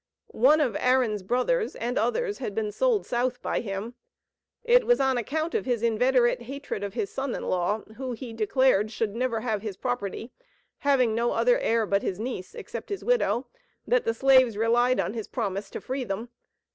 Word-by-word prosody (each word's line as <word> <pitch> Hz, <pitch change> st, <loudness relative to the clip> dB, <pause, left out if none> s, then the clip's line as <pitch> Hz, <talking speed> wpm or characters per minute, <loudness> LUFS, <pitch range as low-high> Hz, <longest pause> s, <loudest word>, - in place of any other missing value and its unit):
One 280 Hz, +7 st, +5 dB
of 245 Hz, -8 st, 0 dB
Aaron's 250 Hz, -5 st, +2 dB
brothers, 255 Hz, -, 0 dB
and 240 Hz, +2 st, -3 dB
others, 410 Hz, -, 0 dB
had 210 Hz, -6 st, -4 dB
been 215 Hz, -2 st, -1 dB
sold 480 Hz, -, +1 dB
South 245 Hz, +1 st, -1 dB
by -, -, 0 dB
him. 205 Hz, +2 st, -5 dB, 0.7 s
It 485 Hz, +1 st, +5 dB
was 485 Hz, -, +4 dB
on 265 Hz, -1 st, +2 dB
account 310 Hz, +8 st, -2 dB
of 445 Hz, -, -1 dB
his 240 Hz, -3 st, 0 dB
inveterate 240 Hz, +2 st, +2 dB
hatred 270 Hz, -4 st, -6 dB
of 200 Hz, +1 st, -5 dB
his 395 Hz, -, -2 dB
son 270 Hz, -1 st, -3 dB
in -, -, -5 dB
law, 185 Hz, +4 st, 0 dB, 0.2 s
who, 260 Hz, -1 st, -4 dB
he 235 Hz, 0 st, -7 dB
declared, 225 Hz, -1 st, +2 dB
should 215 Hz, -1 st, -2 dB
never 235 Hz, -2 st, -1 dB
have 220 Hz, -3 st, -1 dB
his 205 Hz, -3 st, -5 dB
property 245 Hz, -2 st, -3 dB, 0.5 s
(having 265 Hz, -6 st, +3 dB
no 235 Hz, +2 st, +1 dB
other -, -, +3 dB
heir 230 Hz, -, +1 dB
but 200 Hz, 0 st, +1 dB
his 185 Hz, -, -3 dB
niece, 225 Hz, -5 st, -5 dB
except -, -, -7 dB
his 400 Hz, -2 st, -4 dB
widow), 480 Hz, -, +2 dB, 0.4 s
that -, -, +2 dB
the 460 Hz, 0 st, -1 dB
slaves 260 Hz, -5 st, +5 dB
relied 240 Hz, +3 st, +3 dB
on -, -, -1 dB
his 225 Hz, -3 st, -5 dB
promise 200 Hz, -4 st, -3 dB
to -, -, -6 dB
free 260 Hz, +1 st, -3 dB
them. 220 Hz, +2 st, -4 dB
245 Hz, 190 wpm, -26 LUFS, 220-270 Hz, 0.7 s, One